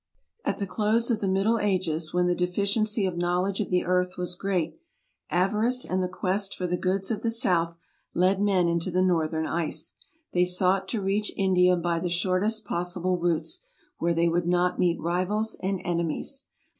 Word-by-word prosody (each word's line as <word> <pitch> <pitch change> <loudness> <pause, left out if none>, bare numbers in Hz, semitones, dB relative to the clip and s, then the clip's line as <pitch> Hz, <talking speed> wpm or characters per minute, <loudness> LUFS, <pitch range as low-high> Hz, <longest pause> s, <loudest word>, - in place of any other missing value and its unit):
At - - -1
the 200 - -2
close 220 +4 +2
of 220 - +1
the 200 - 0
Middle 195 +5 +2
Ages, 175 -6 0
when 180 0 +2
the 180 - +2
deficiency 200 +4 0
of 180 -2 -2
knowledge 180 +3 0
of 210 - -1
the 180 -1 +1
earth 180 0 +1
was 180 0 -2
great, 180 - -2 0.5
avarice 215 +8 +1
and 185 +1 -1
the 180 - 0
quest 195 +2 -1
for 180 - -3
the 180 0 0
goods 190 +3 -1
of 220 - -2
the 230 - 0
south 175 -8 +1 0.4
led 185 +2 +3
men 190 -4 +3
into 170 +1 0
the 185 +1 +2
northern 160 -3 +1
ice; 165 -1 -2 0.4
they 180 - +4
sought 185 +1 +2
to 215 -2 -2
reach 205 +2 0
India 180 -2 +4
by 170 -1 0
the 175 +1 -2
shortest 190 +5 0
possible 180 0 -1
routes, 175 - -1 0.4
where 170 0 +1
they 170 +1 +3
would 170 +1 0
not 180 0 +1
meet 175 -1 +2
rivals 185 +6 0
and 190 0 -1
enemies. 170 - -2
185 Hz, 180 wpm, -27 LUFS, 175-200 Hz, 0.5 s, they